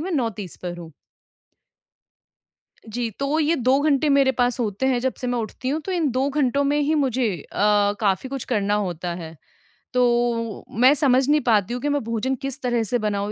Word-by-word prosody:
मैं 360 +4 -4
9:30 220 - -3
पर 175 -1 -4
हूँ। 165 -2 -10 2.0
जी, 235 +1 -2
तो 275 +8 -1
ये 320 +2 +2
2 260 +1 +2
घंटे 295 0 +2
मेरे 275 -1 +4
पास 245 -1 0
होते 215 +1 -1
हैं 250 -2 +2
जब 260 +1 -1
से 250 - -4
मैं 245 0 0
उठती 235 +3 -4
हूँ। 310 +3 -1
तो 385 - -3
इन 335 -5 +1
2 265 +3 0
घंटों 280 -1 +1
में 290 +1 +1
ही 305 +2 +1
मुझे 260 -4 +1
अ, 205 +2 +2
काफ़ी 205 +4 0
कुछ 275 -2 -4
करना 205 -3 +1
होता 175 0 -4
है। 165 -2 -8 0.6
तो 240 -2 +1
मैं 255 +4 +7
समझ 270 -3 +3
नहीं 300 0 +4
पाती 220 -3 +2
हूँ 245 - -4
कि 290 - -1
मैं 290 0 0
भोजन 230 +4 -1
किस 270 +2 -5
तरह 240 -2 0
से 235 +3 0
बनाऊँ 205 -1 -2
250 Hz, 200 wpm, -23 LUFS, 215-275 Hz, 2.0 s, मैं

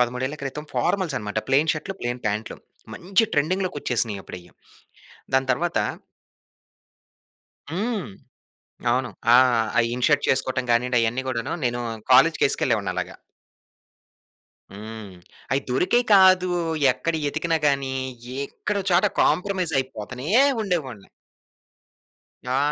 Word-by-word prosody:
13 125 +4 -1
క్రితం 140 +2 -5
ఫార్మల్సనమాట. 140 - -1
ప్లెయిన్ 150 +4 +3
షర్టులు, 160 +5 -5
ప్లెయిన్ 120 +1 -3
పాంట్లు 105 +2 -3 0.4
మంచి 190 +5 +1
ట్రెండింగ్‌లోకి 180 +4 0
వచ్చేసినయి 110 -5 -1
అప్పుడయి. 90 -1 -11 0.8
దాని 130 0 +2
తరువాత 170 +7 -1 1.9
హ్మ్. 205 +5 -2 0.8
అవును. 125 0 0 0.2
ఆహ్, 125 -3 +5
ఆ! - - +6
ఇన్ 125 0 -2
షర్ట్ 145 -2 +2
చేసుకోవటం 130 0 0
గానియ్యండి. 120 +1 +2
అయన్నీ 115 +3 0
గూడాను 120 -3 -3
నేను 120 0 -1 0.3
కాలేజుకి 160 +5 +5
యేసుకెళ్ళేవాడిని 110 -8 0
అలాగా. - - -4 1.6
హ్మ్. 105 -1 -9 0.4
అయి 135 - +2
దొరికేయి 185 - +2
కాదు. 185 -1 +6 0.4
ఎక్కడ 165 +6 -3
యెతికినా 160 +3 0
గాని 140 -2 0 0.5
ఎక్కడో 200 +5 -3
చోట 180 +3 +4 0.2
కాంప్రమైజ్ 185 -3 +1
అయిపోతనే 125 +1 -5 0.3
ఉండేవాడిని. 140 - -3 1.4
ఆ! 130 +1 +1
130 Hz, 105 wpm, -23 LUFS, 120-170 Hz, 1.9 s, ఆ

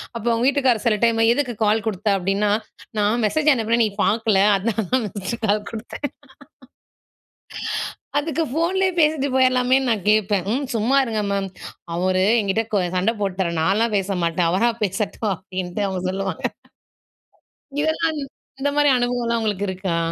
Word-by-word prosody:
அப்ப 230 - -5
அவங்க 230 +1 +1
வீட்டுக்காரர் 265 -5 +2
சில 225 -2 +3
டைம் 230 -1 +3
"எதுக்கு 255 -2 -1
கால் 210 +1 +2
குடுத்த?" 210 -1 -3
அப்டின்னா, 195 +3 0 0.5
"நான் 210 +3 +2
மெசேஜ் 305 +8 +3
அனுப்பினேன், 230 -1 +1
நீ - - 0
பாக்கல. 220 -3 +2
அதனால 215 +2 -1
தான், 255 -3 +2
மிஸ்டு 200 +4 -3
கால் 210 +1 +1
குடுத்தேன்." 230 +5 -5 2.1
அதுக்கு 320 +1 -1
ஃபோன்லேயே 370 +5 +1
பேசிட்டு 300 -2 +2
போயிரலாமேன்னு 255 0 +3
நான் 210 -4 -2
கேட்பேன். 205 -3 +1
"ம். 275 +3 -1
சும்மா 230 +5 +2
இருங்க 220 -3 -1
மேம். 195 -1 -1 0.5
அவரு 185 +1 +1 0.2
என்கிட்ட 210 +1 0
கோ 205 - +3 0.2
சண்ட 195 +5 +1
போட்டாரு. 190 -3 -1
நான்லாம் 210 +6 +2
பேச 195 0 -1
மாட்டேன். 170 0 +1
அவரா 195 +7 +3
பேசட்டும்." 205 +2 -1
அப்டின்ட்டு 185 +2 -4
அவங்க 185 -2 -3
சொல்லுவாங்க. 190 -2 -3 1.4
இதெல்லாம், 315 0 0 0.4
இந்த 285 +1 0
மாரி 290 -1 +5
அனுபவம்லாம் 245 -1 0
உங்களுக்கு 205 -2 -1
இருக்கா? 185 -2 -2
220 Hz, 145 wpm, -22 LUFS, 195-250 Hz, 2.1 s, மாரி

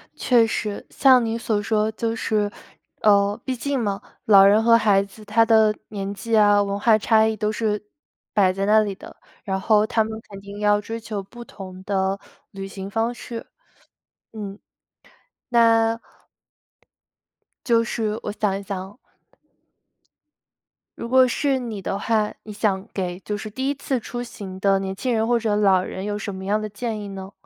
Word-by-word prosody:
确 240 -3 +4
实， 215 -2 -3
像 260 -3 +5
你 225 0 -1
所 220 -2 -1
说， 215 0 0
就 225 +1 -2
是 210 -2 0 0.5
呃， 200 -1 +3
毕 260 - -1
竟 275 +3 -2
嘛， 200 -4 -2 0.2
老 195 -2 +8
人 205 +2 +5
和 230 0 +6
孩 205 -3 +3
子， 200 +2 -14
他 220 +2 +3
的 220 -1 +5 0.2
年 200 -1 -4
纪 225 +3 -1
啊、 205 -1 +5
文 200 0 -2
化 220 +1 +4
差 220 0 +3
异 220 0 0
都 215 -1 -1
是 215 -1 -1 0.5
摆 195 -3 +4
在 195 +1 -2
那 215 +1 +5
里 205 -2 -2
的。 - - -13 0.3
然 190 -1 -2
后 210 +1 +3
他 225 -1 +2
们 220 - -6 0.2
肯 200 -1 -9
定 200 +1 -9
要 205 0 +3
追 225 +2 -6
求 215 -3 -5
不 240 +5 -11
同 185 -3 -10
的 195 0 -1 0.3
旅 195 0 -7
行 195 0 -7
方 225 +3 -1
式， 235 -1 -8 0.9
嗯。 205 -3 -7 0.9
那 230 -1 +4 1.7
就 230 -2 +4
是 220 -2 -2
我 - - -3
想 205 -2 -1
一 - - -9
想 195 -1 -4
哦 195 +4 -11 2.0
如 - - -5
果 260 +1 +5
是 270 +2 0
你 230 -5 -5
的 195 - -2
话， 215 0 0
你 215 - -9
想 200 -2 -1
给 180 -2 -3
就 210 +1 -4
是 215 - -7
第 260 +6 -2
1 - - +1
次 270 -2 -2
出 240 +2 -6
行 195 -6 -8
的 195 0 +3
年 190 0 -4
轻 250 +4 -1
人 220 -1 +1
或 240 0 +2
者 215 -2 0
老 195 -3 +4
人 185 - -6
有 205 0 -2
什 205 -2 -5
么 190 - -7
样 210 +2 +1
的 215 - -3
建 215 +1 -4
议 205 - -6
呢？ 195 0 -8
210 Hz, 195 characters per minute, -23 LUFS, 200-230 Hz, 2.0 s, 老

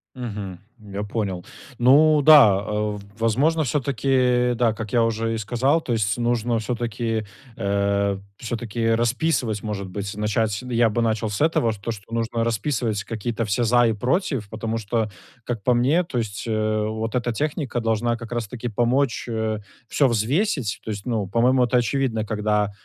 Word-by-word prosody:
Мгм. 105 -7 -6 0.3
Я 100 - -2
понял. 100 -4 -3 0.4
Ну 150 +5 +6
да, 140 -10 +8
э, 105 +1 -2
в - - -10 0.2
возможно, 140 +9 +2
всё-таки, 130 -2 +1
да, 115 -2 +2
как 110 -2 -6
я 120 - +4
уже 115 0 0
и 115 - -2
сказал, 125 +8 +1
то 120 - -1
есть 105 0 0
нужно, 120 0 0
всё-таки, 115 -1 -2 0.3
э, 100 0 0 0.2
всё-таки, 115 -1 -1
расписывать, 120 -2 0
может 100 -3 -4
быть, 100 +2 -5
начать, 105 0 0
н 125 - -7
я 115 -1 +3
бы 115 +2 -1
начал 110 -1 0
с 105 +9 +1
этого, 160 -8 +1
с 110 - -6
то, 100 +4 -4
что 110 +1 -10
нужно 115 0 -1
расписывать 115 -2 -1
какие-то 115 +1 -3
все 105 +4 0
"за 120 +1 +4
и 110 - +1
против", 125 - -1
потому 110 0 -3
что, 110 0 -1 0.4
как 120 -4 -4
по 125 - +3
мне, 135 +9 +3
то 140 -7 -5
есть, 105 -4 -3
э, 110 -1 0
вот 110 +1 -3
эта 120 -1 0
техника 145 -5 -2
должна 115 +1 0
как 115 +1 -10
раз-таки 120 +1 -4
помочь, 120 +4 +1
э, 110 -1 -1 0.3
всё 140 - +3
взвесить, 125 - 0
то 110 - -4
есть, 105 +1 -6
ну, 110 -5 -1
по-моему, 125 +5 +3
это 125 +1 +2
очевидно, 120 -3 0
когда 105 -1 0
115 Hz, 175 wpm, -23 LUFS, 105-125 Hz, 0.4 s, да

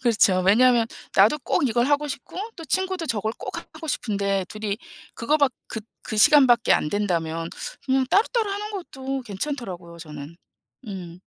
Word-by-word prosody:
그렇죠. 210 -6 +3
왜냐하면 235 +2 +5 0.3
나도 210 +10 +5
꼭 260 +1 +1
이걸 240 +2 +1
하고 290 +1 +2
싶고, 280 +5 -7 0.2
또 330 - -8
친구도 375 -1 -1
저걸 220 -2 -1
꼭 - - -6
하고 320 - -10
싶은데 200 -7 -1
둘이 215 0 -4 0.4
그거 295 +7 +1
밖 285 -4 +2
그 220 - -5 0.2
그 215 - -4
시간 285 +4 +8
밖에 235 -1 +4
안된다면 165 -3 -1 0.4
뭐 265 0 +3
따로따로 440 +1 +2
하는 415 +1 -4
것도 270 -8 -5
괜찮더라고요, 195 - -5
저는. 150 -1 -9 0.5
음. 180 -3 -8
235 Hz, 325 characters per minute, -24 LUFS, 195-285 Hz, 0.5 s, 시간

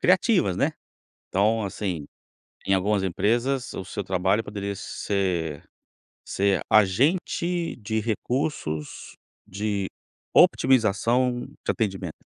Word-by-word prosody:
criativas, 185 - +3
né? - - +1 0.6
Então, 105 +3 +2
assim, 90 -6 -3 0.6
em 95 - +2
algumas 100 +1 +2
empresas 120 +8 0
o 95 - -5
seu 100 - -4
trabalho 95 +3 +1
poderia 100 -1 -4
ser 90 -6 -2 0.6
ser 100 -2 +1
agente 165 - +2
de 110 0 -2
recursos 110 - -3 0.3
de 100 0 -2 0.5
otimização 120 +1 +3 0.2
de - - +2
atendimento. 95 -7 -3
105 Hz, 100 wpm, -25 LUFS, 95-120 Hz, 0.6 s, criativas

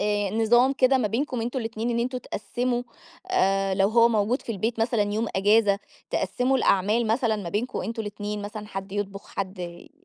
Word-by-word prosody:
آآ، 205 -1 0
نظام 235 +5 +4
كده 265 0 +3
ما 220 -4 +1
بينكم 250 +3 -1
أنتم 240 +3 -2
الاتنين، 225 0 -3
إن 235 - 0
أنتم 255 +2 -1
تقسّموا 240 +2 -2 0.5
آآ، 195 - +2
لو 195 +1 +3
هو 230 +1 +5
موجود 225 +3 +1
في 230 - -4
البيت 225 +3 -2
مثلًا 225 -1 +2
يوم 225 +2 0
أجازة، 205 0 +4 0.3
تقسّموا 260 +2 +1
الأعمال 210 +2 +2
مثلًا 225 0 +1
ما 200 -5 -5
بينكم 215 +8 -2
أنتم 225 0 -3
الاتنين 205 0 -5
مثلًا، 210 +1 -6
حد 195 -1 -6
يطبخ 200 -1 -4
حد 190 -1 -3
ي 175 -1 -8
220 Hz, 185 wpm, -25 LUFS, 200-240 Hz, 0.5 s, هو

